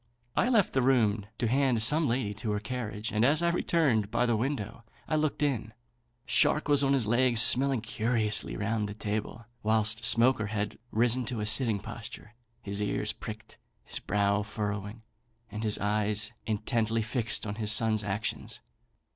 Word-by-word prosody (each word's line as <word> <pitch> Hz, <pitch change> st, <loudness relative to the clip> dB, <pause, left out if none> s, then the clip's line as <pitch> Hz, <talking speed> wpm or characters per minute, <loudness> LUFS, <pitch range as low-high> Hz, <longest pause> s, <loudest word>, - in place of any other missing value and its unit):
I 245 Hz, -, +2 dB
left 220 Hz, -7 st, +2 dB
the 130 Hz, -, +2 dB
room 110 Hz, -6 st, +2 dB
to 120 Hz, -, -1 dB
hand 130 Hz, -2 st, +2 dB
some 150 Hz, +6 st, +4 dB
lady 115 Hz, -4 st, -1 dB
to 105 Hz, +1 st, -6 dB
her 105 Hz, -, -1 dB
carriage, 110 Hz, -1 st, -5 dB
and 110 Hz, +1 st, +1 dB
as 150 Hz, +6 st, +4 dB
I 170 Hz, -, +3 dB
returned 140 Hz, -, +1 dB
by 120 Hz, +2 st, +1 dB
the 120 Hz, -1 st, +1 dB
window, 115 Hz, -2 st, -3 dB, 0.2 s
I 155 Hz, -, 0 dB
looked 150 Hz, -1 st, 0 dB
in. 115 Hz, -6 st, -2 dB, 0.5 s
Shark 150 Hz, +1 st, +2 dB
was 145 Hz, -1 st, +3 dB
on 135 Hz, 0 st, +2 dB
his 130 Hz, -5 st, +2 dB
legs, 120 Hz, +1 st, +3 dB
smelling 130 Hz, +1 st, +6 dB
curiously 110 Hz, -1 st, 0 dB
round 105 Hz, 0 st, -2 dB
the 105 Hz, -, -7 dB
table; 110 Hz, +2 st, -4 dB, 0.2 s
whilst 110 Hz, 0 st, 0 dB
Smoaker 115 Hz, -2 st, +3 dB
had 105 Hz, 0 st, -4 dB
risen 120 Hz, +3 st, +2 dB
to 120 Hz, -1 st, -3 dB
a 105 Hz, -, -2 dB
sitting 110 Hz, 0 st, +2 dB
posture, 105 Hz, +3 st, -10 dB, 0.3 s
his 100 Hz, 0 st, -4 dB
ears 105 Hz, -, -1 dB
pricked, -, -, -10 dB, 0.2 s
his -, -, -4 dB
brow 100 Hz, 0 st, 0 dB
frowning, 105 Hz, +1 st, -5 dB, 0.5 s
and 105 Hz, +1 st, -5 dB
his 105 Hz, -1 st, 0 dB
eyes 105 Hz, +1 st, 0 dB, 0.2 s
intently 110 Hz, +1 st, -1 dB
fixed 115 Hz, 0 st, -2 dB
on 100 Hz, -, -3 dB
his 105 Hz, -1 st, 0 dB
son's 110 Hz, 0 st, +1 dB
actions. 105 Hz, +1 st, -4 dB
110 Hz, 170 wpm, -29 LUFS, 105-125 Hz, 0.5 s, smelling